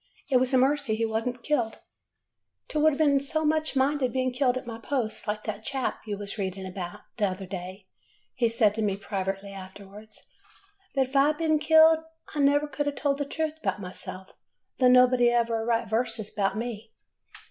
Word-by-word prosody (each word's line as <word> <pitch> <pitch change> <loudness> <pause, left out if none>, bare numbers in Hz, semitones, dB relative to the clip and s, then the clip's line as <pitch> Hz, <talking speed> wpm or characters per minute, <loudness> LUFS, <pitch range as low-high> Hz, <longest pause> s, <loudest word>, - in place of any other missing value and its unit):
It 260 - +6
was 255 +1 +1
a 260 - +4
mercy 270 -3 +2
he 225 +1 0
was 220 +1 -2
n't 245 -1 -4
killed. 245 -7 0 0.5
'' - - -57
T 305 - -1
would 305 -1 +3
n't 285 -3 +4
so 315 +2 -1
much 310 -1 0
minded 265 -1 +1
bein' 255 -1 0
killed 255 -1 +2
at 255 - -6
my 230 -1 -7
post, 230 -4 -3
like 210 0 -2
that 215 0 -5
chap 265 +1 -2
you 205 -1 -3
was 205 +1 -6
readin' 190 0 -3
about 185 -2 -6 0.2
t' 210 - +2
other 190 0 -3
day,' 185 +1 -7 0.5
he 235 -2 +1
said 225 -3 +3
to 220 - -3
me, 200 -2 0
privately 195 0 -4
after 190 +1 -10
ward. 210 +2 -13 0.9
'But 270 - +3
if 270 - -13
I 275 +1 +6
had 300 0 0
been 310 -1 +2
killed, 320 +1 +6 0.3
I 300 - -3
never 285 +1 +4
could 290 0 -3
a' - - +2
told 280 0 -1
the 285 - -1
truth 315 +2 -3
'bout - - -1
myself, 185 0 -9 0.5
though 255 - +5
nobody 250 -1 +6
'll 240 - +2
ever 230 -1 0
write 230 0 0
verses 225 -1 -1
'bout 195 -1 0
me. 225 -1 -5
240 Hz, 205 wpm, -27 LUFS, 205-280 Hz, 0.9 s, It